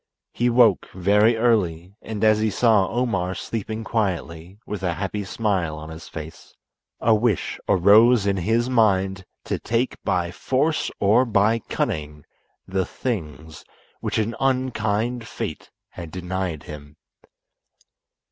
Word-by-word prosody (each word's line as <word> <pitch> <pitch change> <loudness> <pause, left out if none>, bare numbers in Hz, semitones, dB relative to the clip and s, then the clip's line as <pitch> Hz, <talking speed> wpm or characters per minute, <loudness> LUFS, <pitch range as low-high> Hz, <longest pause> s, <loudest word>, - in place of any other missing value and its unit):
He 120 +1 +1
woke 115 -5 +4
very 105 +5 +3
early, 95 -7 +1
and 110 -2 -5
as 110 -1 +5
he 110 0 +1
saw 105 -3 +3
Omar 100 -7 -1
sleeping 110 0 -4
quietly, 90 - -3
with 105 -3 -5
a 90 -3 -1
happy 100 +2 -3
smile 95 -6 -1
on 80 +1 -8
his 80 +1 -10
face, 80 0 -10 0.4
a 115 - +3
wish 110 -4 0
arose 105 +4 +5
in 100 -1 +1
his 115 +6 +1
mind 95 -6 +2 0.2
to - - -3
take 115 +3 -1
by 85 -2 0
force 140 - 0
or 110 +5 +4
by 110 -1 +2
cunning 75 -7 -4 0.4
the 95 0 0
things 80 - -5 0.4
which - - -2
an 110 +1 -1
unkind 125 -3 0
fate - - -6 0.2
had 85 -2 -9
denied 90 -2 -4
him. 75 -1 -10
100 Hz, 130 wpm, -23 LUFS, 90-115 Hz, 0.4 s, as